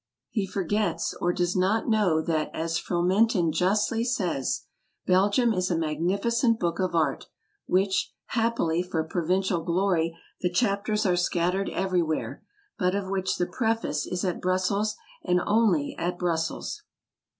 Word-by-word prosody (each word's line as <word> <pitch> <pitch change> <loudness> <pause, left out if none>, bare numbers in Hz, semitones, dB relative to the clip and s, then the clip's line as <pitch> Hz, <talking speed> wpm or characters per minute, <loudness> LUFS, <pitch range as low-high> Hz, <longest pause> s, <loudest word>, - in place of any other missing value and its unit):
He 200 -3 -1
forgets, 200 +3 -1
or 175 - +2
does 175 0 -1
not 190 +4 +1
know, 200 -8 +2
that, 155 -2 0
as 165 +1 -1
Fromentin 180 +1 +2
justly 205 +6 +1
says, 185 - -1 0.4
"Belgium 205 +6 +3
is 185 -2 0
a 170 - +1
magnificent 200 - +1
book 170 -1 -1
of 185 -2 0
art, 155 -4 +1
of - - -33 0.4
which, 190 +1 +1 0.2
happily 225 -8 +1
for 180 -3 -2
provincial 180 +2 0
glory, 170 -2 +1 0.2
the 180 - +1
chapters 210 +2 0
are 180 -2 +3
scattered 180 +2 0
everywhere, 180 -4 -1 0.4
but 180 -1 +1
of 195 -1 -3
which 190 -1 -1
the 175 - +1
preface 220 -6 -1
is 180 +1 -2
at 180 - -2
Brussels, 195 +4 0 0.3
and 180 0 +2
only 205 -9 +2
at 175 +1 -2
Brussels. 165 -2 -2
185 Hz, 140 wpm, -26 LUFS, 170-205 Hz, 0.4 s, Belgium